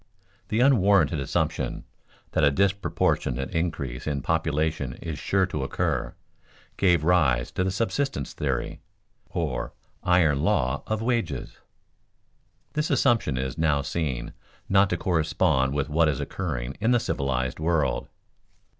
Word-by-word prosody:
_The 115 Hz, +4 st, +3 dB
unwarranted 100 Hz, -, +4 dB
assumption 70 Hz, -, -1 dB, 0.5 s
that 80 Hz, -, +1 dB
a 70 Hz, -, +7 dB
disproportionate 85 Hz, -7 st, 0 dB
increase 75 Hz, -8 st, -2 dB
in 70 Hz, -3 st, -2 dB
population 80 Hz, -4 st, 0 dB
is 80 Hz, 0 st, -6 dB
sure 95 Hz, -1 st, +2 dB
to 75 Hz, -7 st, -3 dB
occur, 65 Hz, -, -1 dB, 0.6 s
gave 90 Hz, -5 st, +3 dB
rise 75 Hz, -8 st, +2 dB
to 90 Hz, -, -1 dB
the 95 Hz, -, 0 dB
subsistence 115 Hz, -, -2 dB
theory, -, -, -2 dB, 0.5 s
or -, -, -3 dB, 0.3 s
iron 80 Hz, -6 st, +3 dB
law 70 Hz, -7 st, +1 dB
of 110 Hz, 0 st, -1 dB
wages._ 115 Hz, -, -2 dB, 1.2 s
This 150 Hz, 0 st, -1 dB
assumption 120 Hz, -, +2 dB
is 65 Hz, +2 st, -3 dB
now 75 Hz, -3 st, +2 dB
seen 65 Hz, -7 st, -3 dB, 0.3 s
not 95 Hz, 0 st, +4 dB
to 90 Hz, -, 0 dB
correspond 75 Hz, -6 st, +1 dB
with 70 Hz, -2 st, 0 dB
what 80 Hz, +1 st, +3 dB
is 70 Hz, -, -1 dB
occurring 70 Hz, -7 st, -4 dB
in 110 Hz, +3 st, +1 dB
the 120 Hz, -1 st, +4 dB
civilized 65 Hz, -, -2 dB
world. 80 Hz, -3 st, 0 dB
80 Hz, 130 wpm, -26 LUFS, 70-95 Hz, 1.2 s, a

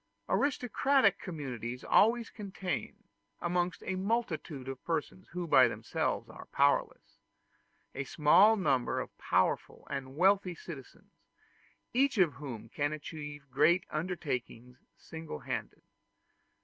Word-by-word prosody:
Aristocratic 265 Hz, -4 st, +2 dB
communities 125 Hz, -, -5 dB
always 230 Hz, +2 st, +3 dB
contain, 195 Hz, -3 st, -5 dB, 0.4 s
amongst 175 Hz, +1 st, -1 dB
a 190 Hz, -, -1 dB
multitude 185 Hz, -, -2 dB
of 135 Hz, -1 st, -6 dB
persons 170 Hz, +3 st, -3 dB
who 175 Hz, 0 st, -4 dB
by 165 Hz, -, +6 dB
themselves -, -, -2 dB
are -, -, -11 dB
powerless, -, -, +1 dB, 0.7 s
a 135 Hz, -, -3 dB
small 175 Hz, -, +6 dB
number 135 Hz, -10 st, +1 dB
of -, -, -6 dB
powerful -, -, 0 dB
and 135 Hz, -1 st, -4 dB
wealthy 190 Hz, 0 st, +3 dB
citizens, 150 Hz, -5 st, -11 dB, 0.8 s
each 265 Hz, 0 st, +2 dB
of 175 Hz, -7 st, +4 dB
whom 120 Hz, -7 st, -7 dB
can 145 Hz, +6 st, -1 dB
achieve 150 Hz, -1 st, -7 dB
great 175 Hz, +6 st, +4 dB
undertakings 130 Hz, -7 st, -4 dB, 0.2 s
single 160 Hz, -, -8 dB
handed. -, -, -5 dB
165 Hz, 110 wpm, -32 LUFS, 140-190 Hz, 0.8 s, by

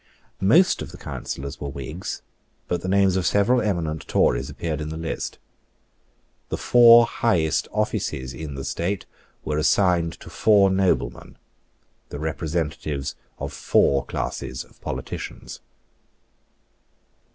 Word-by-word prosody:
Most 140 Hz, -, +4 dB
of -, -, -6 dB
the -, -, -11 dB
Councillors 70 Hz, +1 st, -6 dB
were 70 Hz, -, -3 dB
Whigs; 70 Hz, +6 st, -6 dB, 0.4 s
but 90 Hz, -, -1 dB
the -, -, -5 dB
names 95 Hz, -1 st, +3 dB
of 95 Hz, -2 st, 0 dB
several 110 Hz, +5 st, +3 dB
eminent 85 Hz, -7 st, -2 dB
Tories 65 Hz, +3 st, +2 dB
appeared 80 Hz, -3 st, -4 dB
in 75 Hz, -, -4 dB
the 80 Hz, -, -5 dB
list. 80 Hz, 0 st, -4 dB, 1.1 s
The -, -, -2 dB
four 120 Hz, -1 st, +7 dB
highest 85 Hz, -11 st, +1 dB
offices 65 Hz, -1 st, -2 dB
in 75 Hz, -1 st, -6 dB
the 70 Hz, -, -5 dB
state 90 Hz, +8 st, -2 dB, 0.4 s
were 75 Hz, 0 st, 0 dB
assigned 85 Hz, 0 st, +2 dB
to -, -, -11 dB
four 100 Hz, -3 st, +4 dB
noblemen, 95 Hz, -1 st, 0 dB, 0.7 s
the -, -, -6 dB
representatives 75 Hz, -3 st, -3 dB, 0.2 s
of -, -, -5 dB
four 70 Hz, 0 st, +2 dB
classes 65 Hz, -2 st, -4 dB
of -, -, -24 dB
politicians. -, -, -6 dB
80 Hz, 125 wpm, -24 LUFS, 75-100 Hz, 1.1 s, four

